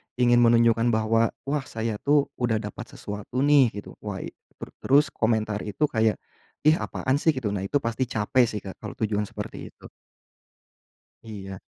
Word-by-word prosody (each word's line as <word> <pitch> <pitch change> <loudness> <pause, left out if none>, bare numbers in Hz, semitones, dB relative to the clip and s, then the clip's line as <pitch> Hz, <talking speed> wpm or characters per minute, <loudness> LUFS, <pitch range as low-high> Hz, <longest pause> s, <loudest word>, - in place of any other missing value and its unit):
ingin 120 -1 +4
menunjukkan 115 0 +4
bahwa, 115 +1 +2
wah 140 0 -2
saya 110 -1 -3
tuh 145 -1 +2
udah 120 -2 +1
dapat - - -7
sesuatu 105 +6 -4
nih, 145 -2 +6 0.2
gitu. - - -12
Wah 100 -3 -5
i - - -7 0.3
ter - - -7
terus 145 +3 +4
komentar 110 -2 0
itu 110 +8 0
kayak, 110 -5 +1 0.5
"Ih, 155 - +7
apaan 130 -5 -1
sih," 160 - +3
gitu. 130 -4 -3
Nah, 95 - -3
itu 145 - +1
pasti 115 +3 -1
capek 120 +3 +2
sih 105 -1 -4
Kak, 95 - -9
kalau - - -8
tujuan 105 -1 0
seperti - - -7
itu. - - -15 1.3
Iya. 95 -4 -8
115 Hz, 170 wpm, -25 LUFS, 105-130 Hz, 1.3 s, Ih